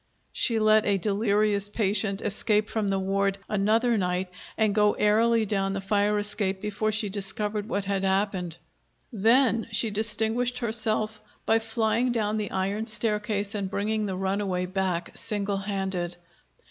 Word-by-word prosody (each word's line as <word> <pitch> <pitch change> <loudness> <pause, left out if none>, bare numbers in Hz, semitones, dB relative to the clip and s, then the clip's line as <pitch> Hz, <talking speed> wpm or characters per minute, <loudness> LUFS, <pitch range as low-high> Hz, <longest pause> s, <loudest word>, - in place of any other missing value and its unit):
She 230 - +1
let 215 0 +4
a 200 -1 +3
delirious 205 0 +1
patient 205 -1 0
escape 210 +1 0
from 220 -2 -1
the 195 0 +1
ward 195 +1 0
another 220 +3 +2
night 180 0 -1 0.3
and 215 -2 +2
go 210 0 +3
airily 225 +2 +3
down 195 -1 0
the 195 - -2
fire 205 +1 +1
escape 205 -2 -1
before 210 +1 -1
she 215 0 +1
discovered 210 +2 -3
what 200 0 -1
had 195 0 -1
happened! 190 -3 0 0.6
Then 230 +2 +3
she 225 - +2
distinguished 220 +3 +1
herself 220 -2 -1 0.2
by 225 0 +3
flying 225 +2 0
down 215 -2 0
the 210 -2 -2
iron 200 +4 -2
staircase 210 -2 0
and 200 -3 -3
bringing 215 +2 -1
the 190 - -3
runaway 190 -1 -1
back 185 -2 -2
single 205 -2 -2
handed. 190 -3 -3
210 Hz, 145 wpm, -26 LUFS, 195-220 Hz, 0.6 s, let